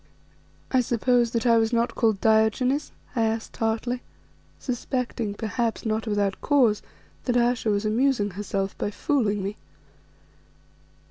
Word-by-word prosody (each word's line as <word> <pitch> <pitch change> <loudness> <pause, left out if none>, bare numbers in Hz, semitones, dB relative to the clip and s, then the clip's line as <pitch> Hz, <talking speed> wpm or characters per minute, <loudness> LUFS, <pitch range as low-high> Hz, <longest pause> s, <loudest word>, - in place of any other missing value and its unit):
"I 260 - +4
suppose 240 0 +2
that 230 0 -2
I 230 -1 +5
was 225 0 +1
not 235 0 +1
called 220 -4 +1
Diogenes?" 220 +6 +2 0.2
I 235 - +1
asked 225 0 -1
tartly, 230 +2 -1 0.6
suspecting, 245 -4 -3
perhaps 225 +2 -2
not 220 +1 -1
without 205 -2 0
cause, 245 -8 +3 0.4
that 245 -1 +2
Ayesha 240 -1 +2
was 205 0 +1
amusing 220 -1 +2
herself 195 0 -3
by - - -1
fooling 210 -4 0
me. 200 +2 -4
225 Hz, 130 wpm, -25 LUFS, 210-245 Hz, 0.6 s, I